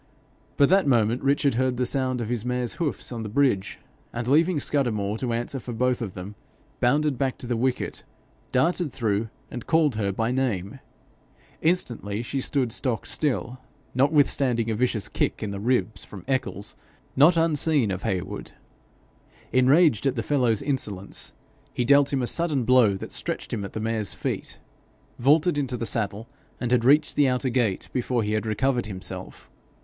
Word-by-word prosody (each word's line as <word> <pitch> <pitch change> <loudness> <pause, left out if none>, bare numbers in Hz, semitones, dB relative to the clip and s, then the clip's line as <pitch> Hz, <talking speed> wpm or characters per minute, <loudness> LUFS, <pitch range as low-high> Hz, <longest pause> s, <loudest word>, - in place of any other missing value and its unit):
But 140 - +5
that 190 -3 +4
moment 120 -2 +2
Richard 140 0 +2
heard 130 +1 0
the 125 - +1
sound 130 -1 0
of 115 - -4
his 120 -3 -1
mare's 125 -1 -1
hoofs 150 -5 -1
on 120 -2 -4
the 110 - -5
bridge, 110 -5 +1 0.3
and 120 0 -4
leaving 160 +4 +3
Scudamore 110 -9 0
to 125 -2 -2
answer 120 +4 -2
for 120 0 -7
them - - -7
both, 110 -6 -2 0.5
bounded 140 +1 +2
back 135 -2 0
to - - -9
the 120 0 -1
wicket, 125 +2 -2 0.5
darted 165 +3 +1
through, 110 -3 -1 0.2
and 120 - -7
called 160 -4 +3
her 100 -2 0
by 110 +4 -1
name. 125 -4 -2 0.8
Instantly 120 - 0
she 135 +3 -3
stood 130 -3 0
stock 120 -1 -1
still, 125 - -1 0.3
notwithstanding 130 -4 +2
a - - 0
vicious 115 -3 0
kick - - -2
in 105 - -3
the 100 - -5
ribs 110 -3 0
from 95 -4 -11
Eccles, 130 -7 -2 0.4
not 160 +5 +6
unseen 155 -7 +2
of 95 0 -3
Heywood. 90 -1 -4 1.0
Enraged 135 - +4
at 135 - 0
the 115 - -2
fellow's 125 -5 +1
insolence, 105 -9 -3 0.4
he 125 - 0
dealt 140 +2 +5
him 135 -3 0
a - - +1
sudden 155 -5 0
blow 120 -5 +4
that 95 - -7
stretched - - -4
him 100 - -2
at 100 - -7
the - - -3
mare's 110 -2 -1
feet, - - -4 0.6
vaulted 150 +5 +3
into 130 -3 -2
the 115 - -3
saddle, 110 0 -2 0.3
and 125 -1 -2
had 125 -2 +3
reached 145 +4 +4
the 145 -2 +4
outer 130 +1 0
gate 115 -6 0
before 125 -2 0
he 105 - -2
had 110 +1 -1
recovered 125 +2 0
himself. 95 -3 -7
125 Hz, 170 wpm, -25 LUFS, 110-140 Hz, 1.0 s, not